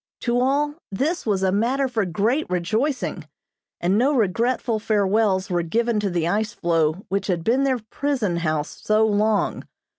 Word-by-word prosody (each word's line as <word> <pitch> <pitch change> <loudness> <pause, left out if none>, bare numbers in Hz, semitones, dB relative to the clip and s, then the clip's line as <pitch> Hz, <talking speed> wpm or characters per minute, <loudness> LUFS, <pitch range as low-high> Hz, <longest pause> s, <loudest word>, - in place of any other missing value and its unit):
To 240 0 +1
all, 285 +3 +1 0.2
this 280 - -1
was 195 -3 +1
a 190 - +2
matter 250 +7 +1
for 225 -5 -1
great 220 - 0
rejoicing, 195 - -1 0.5
and 185 +4 +2
no 280 +4 +2
regretful 230 +1 0
farewells 205 -2 +1
were 175 -1 +1
given 230 +6 0
to 205 -1 -1
the 170 -2 -1
ice 210 +3 0
floe 165 +1 0
which 195 +1 -1
had 175 -4 -1
been 255 +7 +2
their 260 -2 +2
prison 250 -11 -1
house 155 -3 -2
so 215 +1 +3
long. 210 0 +1
215 Hz, 160 wpm, -23 LUFS, 185-245 Hz, 0.5 s, so